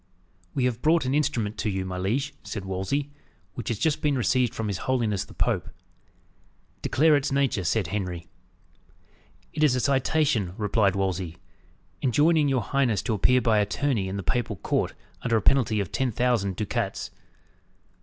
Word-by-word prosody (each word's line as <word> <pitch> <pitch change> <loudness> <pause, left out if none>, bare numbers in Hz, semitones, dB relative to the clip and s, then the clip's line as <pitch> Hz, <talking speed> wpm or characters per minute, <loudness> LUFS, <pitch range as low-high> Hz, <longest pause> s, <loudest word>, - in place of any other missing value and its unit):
"We 130 - +1
have 125 -2 -1
brought 160 -1 +3
an 130 - 0
instrument 115 -8 0
to 110 - 0
you, 95 -1 -2
my 90 0 -4
liege," 135 +10 -1
said 100 -3 -6
Wolsey, 95 +10 -2 0.4
"which 115 - -7
has 115 - -1
just 155 +5 0
been 145 -2 +1
received 125 0 +2
from 110 - -2
his 100 -3 -2
holiness 115 -6 +1
the - - -15
Pope." - - 0 1.1
"Declare 155 +2 +4
its 145 0 -2
nature," 135 -7 +1
said 100 +4 +1
Henry. 90 -2 -4 1.3
"It 155 - 0
is 140 -4 +4
a - - +1
citation," 135 - +1
replied 105 -2 +2
Wolsey, 95 -3 -2 0.6
"enjoining 150 +4 +3
your 130 -4 +1
high 140 0 +1
ness 110 -5 0
to 115 - -1
appear 125 +5 +3
by 110 -2 +3
attorney 105 0 0
in 95 +1 -4
the 100 - -4
papal 120 0 -1
court, 80 - -1 0.3
under 115 -2 +1
a - - 0
penalty 125 -6 +3
of 100 -4 -3
ten 130 -2 0
thousand 115 -5 +1
ducats." 105 0 -3
115 Hz, 170 wpm, -26 LUFS, 100-135 Hz, 1.3 s, Declare